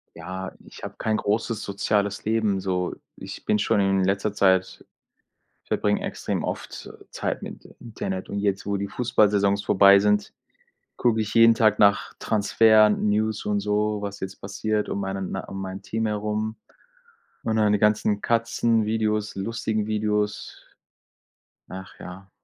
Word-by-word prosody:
Ja, 95 0 -6
ich - - -14
habe - - -7
kein 110 -1 0
großes 110 +2 -1
soziales 100 0 -1
Leben, 110 -3 +1
so. 90 -1 -2 0.2
Ich - - -9
bin 105 - +2
schon 105 - +1
in 95 -1 +2
letzter 100 +2 0
Zeit 95 -2 +2 0.8
verbringe - - 0
extrem - - -3
oft - - -6 0.2
Zeit - - -3
mit - - -9 0.2
Internet 95 -5 -5
und 100 - -3
jetzt, 100 -1 -1
wo 100 0 -1
die 100 0 -2
Fußballsaisons 100 -3 +2
vorbei 100 +1 +6
sind, 105 0 +1 0.6
gucke 115 -2 +1
ich 110 -1 -2
jeden 115 0 +7
Tag 110 -2 +3
nach 100 -1 +3
Transfer, 110 0 +4
News 105 +1 0
und 105 -1 0
so, 105 +1 0
was 100 0 -6
jetzt 95 0 -6
passiert, 105 +2 -2
um 100 - -3
meinen 95 -1 -4
äh, 95 - -4
um 95 - -6
mein 95 0 -6
Team 110 +3 -3
herum 105 +1 -2 0.9
und 110 - -1
dann 105 -1 +3
die 105 - +2
ganzen 105 -1 +2
Katzenvideos, 110 -2 0
lustigen 110 +1 -2
Videos. 105 -1 -2 1.1
Ach 95 +1 -9
ja, 95 +2 -10
105 Hz, 145 wpm, -24 LUFS, 100-110 Hz, 1.1 s, jeden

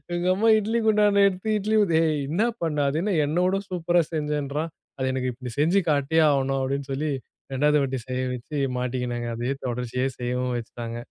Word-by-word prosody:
எங்க 175 +1 -1
அம்மா 225 +3 +3
இட்லி 225 +3 0
குண்டானை 205 -1 +4
எடுத்து 200 +3 -1
இட்லி 215 +2 0
ஊத்த, 170 -5 +1
"ஏய் 155 -2 +1
என்ன 175 +8 +1 0.2
பண்ண? 155 -2 -1
அது 155 +3 -1
என்ன 205 -2 0
என்னைவிட 180 +6 +1
சூப்பரா 175 -1 +2
செஞ்சேன்றான். 150 +1 -2 0.3
அது 130 0 0
எனக்கு 130 -1 -1
இப்படி 125 -1 -8
செஞ்சு 175 +6 +4
காட்டியே 150 +3 +2
ஆவுணும்" 135 -1 +1
அப்படின்னு 135 +1 -2
சொல்லி 150 +2 -1 0.4
இரண்டாவது 150 +2 +3
வாட்டி 135 -1 -2
செய்ய 130 0 -2
வச்சு 145 +5 -6 0.2
மாட்டிக்கினேங்க. 120 -1 -2
அதை 120 +3 -1 0.2
தொடர்ச்சிய 125 +2 -2
செய்யவும் 125 0 -1
வச்சுட்டாங்க. 115 0 -6
145 Hz, 175 wpm, -25 LUFS, 130-175 Hz, 0.4 s, குண்டானை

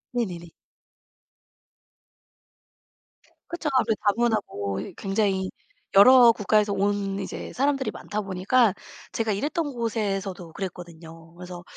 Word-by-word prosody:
네네네. 175 -8 -3 3.0
그렇죠. 340 -3 -3
아무래도 225 -3 +2
다문화고 205 - 0
이 110 - -8
굉장히 195 -2 -1 0.5
여러 240 +4 +8
국가에서 210 -1 +1
온 200 0 -1
이제 195 - -6
사람들이 270 -3 0
많다 210 +1 -5
보니까 200 +4 +2 0.4
제가 225 -1 -1
일했던 290 - -2
곳에서도 195 -7 -3
그랬거든요. 165 -3 -9
그래서 180 0 -9
200 Hz, 270 characters per minute, -25 LUFS, 180-230 Hz, 3.0 s, 여러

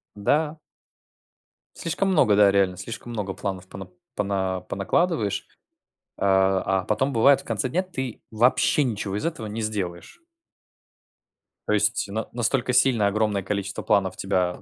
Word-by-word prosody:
Да. 150 +9 0 1.2
Слишком 170 +4 -1
много, 145 - +4
да, 100 -1 +6
реально, 95 -2 +2
слишком 120 +1 -7
много 100 -4 -3
планов 95 -1 -5
пона 95 -1 -9 0.3
пона 95 -2 -1
понакладываешь, 105 - 0 0.7
э, - - -7
а, 95 -1 +2
потом, 130 +6 0
бывает, 135 +4 +5
в - - -9
конце 115 +2 -2
дня 175 +8 0
ты 130 - -6
вообще 125 +5 +3
ничего 100 -4 -3
из 105 - -2
этого 160 -10 -4
не 110 +2 -5
сделаешь. 105 - -4 1.5
То - - +1
есть 105 0 +1
на 110 +2 -3
настолько 125 +1 0
сильно 125 -4 +4
огромное 105 -1 0
количество 100 0 -3
планов 95 -3 +1
тебя 90 -2 -1
105 Hz, 140 wpm, -24 LUFS, 95-125 Hz, 1.5 s, да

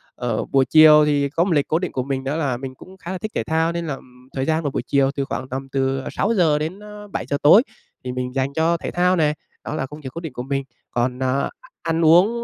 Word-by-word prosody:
ờ, 120 -3 -2
buổi 135 -1 +2
chiều 150 +1 +7
thì 145 -1 +1
có 165 +4 +1
một 185 - -1
lịch 145 -2 +2
cố 160 - +1
định 180 -1 -3
của 130 - -2
mình 135 -1 -3
đó 135 +2 -2
là 140 -6 -1
mình 130 0 -7
cũng 185 +7 -14
khá 180 -1 -7
là 190 - -3
thích 215 +4 -5
thể - - 0
thao, 160 +1 +1
nên 170 -1 -4
là, 145 - -2
ừm, 125 0 -18
thời 135 0 -1
gian 160 +1 0
của 145 - 0
buổi - - -2
chiều 140 -1 +2
từ 140 - -1
khoảng 130 -1 -5
tầm 135 +1 -5
từ 135 0 0
6:00-7:00 195 -1 -1
tối 195 +11 +8 0.4
thì 125 - -4
mình 125 0 -4
dành 135 +1 -1
cho 165 +2 +2
thể - - -5
thao 180 +1 +2
này, 150 -3 +2 0.3
đó - - -5
là 155 - -2
công 150 +3 -11
việc 130 - -6
cố 170 - -6
định 160 -6 -7
của 125 - -5
mình. 135 0 -2 0.3
Còn, 125 +1 -1
ờ, 130 +1 0 0.3
ăn 165 0 0
uống 200 +9 +5
150 Hz, 255 wpm, -21 LUFS, 135-170 Hz, 0.4 s, tối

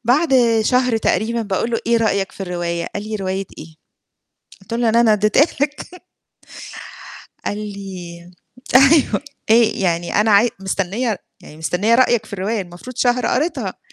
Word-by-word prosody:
بعد 275 +5 +2 0.3
شهر 250 0 +2
تقريبًا 225 +1 0
باقول 205 +3 -2
له: 230 - 0
"إيه 235 0 +3
رأيك 200 -4 0
في 195 - -8
الرواية؟" 175 -2 -3
قال 205 - -3
لي: 215 - -2
"رواية 190 -1 -3
إيه؟" 160 0 -11 0.9
قُلت 195 - -13
له: 235 0 +1
"اللي 230 +1 +3
أنا 225 -2 +4
ادّيتها 215 - +3
لك." 300 +5 -4 1.4
قال 205 - -2
لي 185 -4 -8 0.4
أيوه 275 +2 +5 0.3
آآ - - +8 0.3
يعني 175 -2 -1
أنا 215 0 +2
عاي 215 +4 +5
مستنية 195 +3 -2 0.2
يعني 150 - -14
مستنية 185 +8 +1
رأيك 240 -3 +3
في 210 - -12
الرواية، 200 +2 -2
المفروض 180 +8 -11
شهر 245 0 +1
قريتها. 305 +8 -2
215 Hz, 150 wpm, -19 LUFS, 190-240 Hz, 1.4 s, آآ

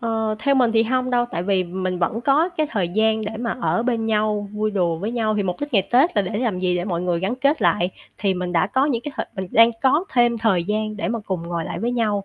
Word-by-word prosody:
Ờ, 225 -2 -1
theo 275 +6 +2
mình 245 -4 +3
thì 225 - +4
hông 255 +2 0
đâu, 245 -1 +2
tại 170 - -3
vì 190 -1 +1
mình 185 +1 -3
vẫn 180 +6 -1
có 285 +7 +3
cái 315 -4 -2
thời 185 -5 -1
gian 220 +3 +1
để 220 +1 -5
mà 235 0 -3
ở 230 - +1
bên 235 -2 -1
nhau, 210 -1 0
vui 215 0 -1
đùa 175 -5 0
với 205 +7 -4
nhau, 220 -3 0
thì 205 - +1
mục 180 -2 -3
đích 290 0 -4
ngày 195 -5 +2
Tết 260 +4 +3
là 205 - +4
để 200 +3 -3
làm 225 -6 -1
gì, 180 -1 0
để 175 - -2
mọi 175 -3 -2
người 175 -2 0
gắn 195 +6 -1
kết 280 0 +1
lại, 175 0 +2 0.3
thì 195 -2 +1
mình 180 -1 -3
đã 170 0 +2
có 260 +7 +1
những 240 -6 -1
cái 295 - -6
thời - - -3
mình 190 -1 -3
đang 230 +1 +6
có 285 +6 +3
thêm 240 -1 +3
thời 200 -6 +1
gian 215 +2 -2
để 210 - -2
mà 230 - -1
cùng 185 -3 -2
ngồi 170 -1 -3
lại - - -5
với 240 +2 -1
nhau. 210 -4 0
215 Hz, 285 wpm, -22 LUFS, 185-240 Hz, 0.3 s, đang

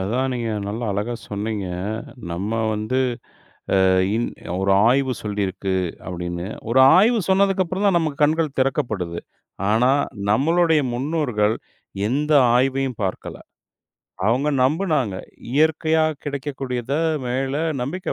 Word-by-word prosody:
அதான் 125 +7 -1
நீங்க 115 -2 -2 0.2
நல்லா 115 +3 -4
அழகா 105 +5 -2
சொன்னீங்க. 105 -1 -3 0.6
நம்ம 95 +6 -3 0.2
வந்து 110 +5 -1 0.9
அ - - +4 0.3
இன் 120 - 0 0.3
"ஒரு 95 0 +1 0.2
ஆய்வு 130 0 +2
சொல்லிருக்கு." 100 -2 -2 0.3
அப்படின்னு. 85 0 -4 0.2
ஒரு 130 +2 +4 0.2
ஆய்வு 225 +2 +4
சொன்னதுக்கு 195 0 +3
அப்புறம்தான் 185 +1 +1
நமக்குக் 155 -2 -2
கண்கள் 155 -1 0
திறக்கப்படுது. 110 - -1 0.5
ஆனா, 125 +4 +3 0.4
நம்மளுடைய 160 +5 +3
முன்னோர்கள் 125 -6 0 0.5
எந்த 150 +4 0 0.2
ஆய்வையும் 135 -2 0
பார்க்கல. 95 - -4 0.9
அவுங்க 130 +6 +1
நம்புனாங்க. 145 - +1 0.4
இயற்கையா 160 +2 +2 0.2
கிடைக்கக்கூடியத 135 -3 -3 0.3
மேல 135 +2 -1 0.3
நம்பிக்கை 170 +9 -3
130 Hz, 105 wpm, -22 LUFS, 105-155 Hz, 0.9 s, அ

